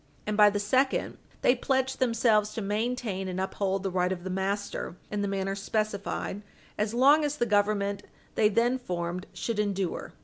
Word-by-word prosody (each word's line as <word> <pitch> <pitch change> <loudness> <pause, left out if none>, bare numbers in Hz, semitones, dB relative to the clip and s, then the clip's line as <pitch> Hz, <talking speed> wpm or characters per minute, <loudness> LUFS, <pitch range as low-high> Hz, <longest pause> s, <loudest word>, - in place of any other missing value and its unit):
And 210 - -1
by 210 0 +7
the 205 0 -1
second, 260 +6 +1 0.2
they - - +6
pledge 265 +1 0
themselves 225 -4 +2
to 225 - -2
maintain 210 -2 -2
and 185 0 -3
uphold 190 0 -1
the 195 - -1
right 180 0 +1
of 180 -2 -4
the 190 - -4
master 195 -1 -2 0.2
in 210 -1 -1
the 200 - 0
manner 195 0 -1
specified, 205 0 -2 0.3
as 210 +2 -1
long 285 +5 +6
as 295 0 -1
the 240 - +1
Government 205 -2 +1 0.3
they 210 - +4
then 240 +4 +2
formed 180 -4 -4
should 230 -3 -3
endure. 195 -3 -2
205 Hz, 175 wpm, -28 LUFS, 195-230 Hz, 0.3 s, by